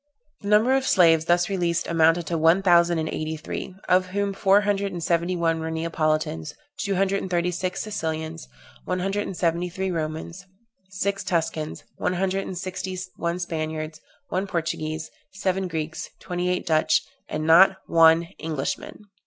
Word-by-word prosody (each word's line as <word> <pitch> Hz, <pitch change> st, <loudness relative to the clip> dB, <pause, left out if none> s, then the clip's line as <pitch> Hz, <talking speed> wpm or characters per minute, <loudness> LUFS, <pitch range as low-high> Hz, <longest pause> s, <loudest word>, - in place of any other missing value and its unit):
The 200 Hz, -, -7 dB
number 215 Hz, +5 st, +4 dB
of 270 Hz, 0 st, +1 dB
slaves 165 Hz, -4 st, +5 dB
thus 175 Hz, 0 st, +3 dB
released 175 Hz, -3 st, 0 dB
amounted 165 Hz, 0 st, +3 dB
to 170 Hz, -, -2 dB
one 165 Hz, +4 st, +4 dB
thousand 170 Hz, -2 st, +5 dB
and 160 Hz, 0 st, -1 dB
eighty 155 Hz, 0 st, -3 dB
three, 170 Hz, +4 st, -6 dB
of 185 Hz, 0 st, +3 dB
whom 200 Hz, +1 st, -1 dB
four 195 Hz, +1 st, +4 dB
hundred 200 Hz, -1 st, 0 dB
and 175 Hz, -2 st, -5 dB
seventy 170 Hz, +2 st, +1 dB
one 165 Hz, -1 st, +1 dB
were 160 Hz, 0 st, -3 dB
Neapolitans, 155 Hz, -, -1 dB, 0.2 s
two 200 Hz, -7 st, -1 dB
hundred 195 Hz, +1 st, +1 dB
and 190 Hz, -, -5 dB
thirty 175 Hz, 0 st, +1 dB
six 180 Hz, +1 st, -3 dB
Sicilians, 160 Hz, -5 st, -4 dB, 0.4 s
one -, -, -2 dB
hundred 195 Hz, +3 st, -1 dB
and 185 Hz, -, -6 dB
seventy 170 Hz, +1 st, 0 dB
three 190 Hz, +1 st, -3 dB
Romans, 165 Hz, +3 st, -4 dB, 0.4 s
six 195 Hz, +1 st, -2 dB
Tuscans, 160 Hz, -2 st, -2 dB
one -, -, 0 dB
hundred 190 Hz, +1 st, -1 dB
and 185 Hz, -, -5 dB
sixty 185 Hz, 0 st, -4 dB, 0.2 s
one 170 Hz, +1 st, -2 dB
Spaniards, 155 Hz, -2 st, -4 dB, 0.3 s
one 190 Hz, +2 st, -1 dB
Portuguese, 160 Hz, -3 st, -3 dB, 0.2 s
seven 190 Hz, -1 st, -1 dB
Greeks, 160 Hz, -2 st, -4 dB
twenty 180 Hz, 0 st, -2 dB
eight 180 Hz, -, -1 dB
Dutch, 155 Hz, -2 st, +3 dB, 0.3 s
and 155 Hz, 0 st, -3 dB
not 185 Hz, +4 st, +7 dB
one 165 Hz, 0 st, +5 dB, 0.2 s
Englishman. 155 Hz, +6 st, -4 dB
175 Hz, 165 wpm, -24 LUFS, 160-190 Hz, 0.4 s, not